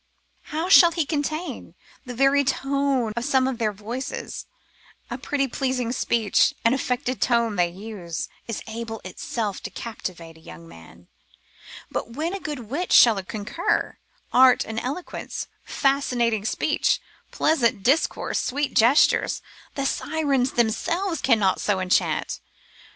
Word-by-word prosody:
How 320 +3 -3
shall 370 -2 +8
he 330 -2 -1
contain? 310 +3 -3 0.3
The 245 - -6
very 275 +3 +4
tone 270 -3 0
of 235 - -2
some 260 0 +2
of 260 -3 -3
their 215 -2 +1
voices, 225 +6 -6 0.6
a - - -3
pretty 275 -2 -1
pleasing 255 -2 -1
speech, 230 -4 +2
an 230 - +5
affected 255 -1 -2
tone 235 -3 +2
they 175 -2 +2
use, 185 -3 -6 0.2
is 230 - -4
able 225 0 -5
of 220 - -13
itself 205 +2 -4
to - - -6
captivate 180 -7 -7
a - - -18
young 85 - -12
man; 85 +1 -15 0.8
but 230 - -4
when 320 +5 -2
a 395 - -3
good 300 -7 -5
wit 280 +11 -4
shall 225 -5 +7
concur, 205 +2 -2 0.3
art 255 0 +6
and 225 0 -4
eloquence, 280 +10 -5 0.2
fascinating 245 -6 0
speech, 220 - +1 0.3
pleasant 235 -9 +1
discourse, 275 +7 +1
sweet 285 +2 -1
gestures, 240 +7 +4 0.3
the 275 - -2
Sirens 280 -3 0
themselves 330 - 0
cannot 215 -7 +2
so 205 -2 +1
enchant. 185 0 0
245 Hz, 135 wpm, -24 LUFS, 215-275 Hz, 0.8 s, shall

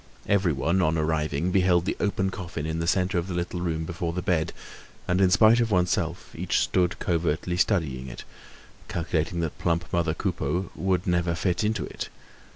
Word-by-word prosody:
Everyone, 95 -2 +2
on 80 -1 +2
arriving, 80 +1 0
beheld 90 -2 +3
the - - -1
open 95 -2 0
coffin 90 -6 -5
in 80 +1 -2
the 85 - -1
centre 90 0 +2
of 85 - -4
the 90 - -4
little 85 0 -2
room 80 -2 -1
before 85 0 -3
the 90 +1 -3
bed; 80 -3 +1 0.6
and 90 +2 +2
in 95 - +5
spite 110 +6 +6
of 115 -1 +2
oneself, 90 -3 0
each - - -1
stood 90 0 +1
covertly 85 0 0
studying 80 - 0
it, - - -8 0.6
calculating 85 0 -1
that 80 -3 -3
plump 85 +1 0
mother 85 -2 +1
Coupeau 90 0 -2
would 95 0 0
never 85 -2 +1
fit 90 +3 0
into 110 0 0
it. - - -6
85 Hz, 175 wpm, -26 LUFS, 80-95 Hz, 0.6 s, spite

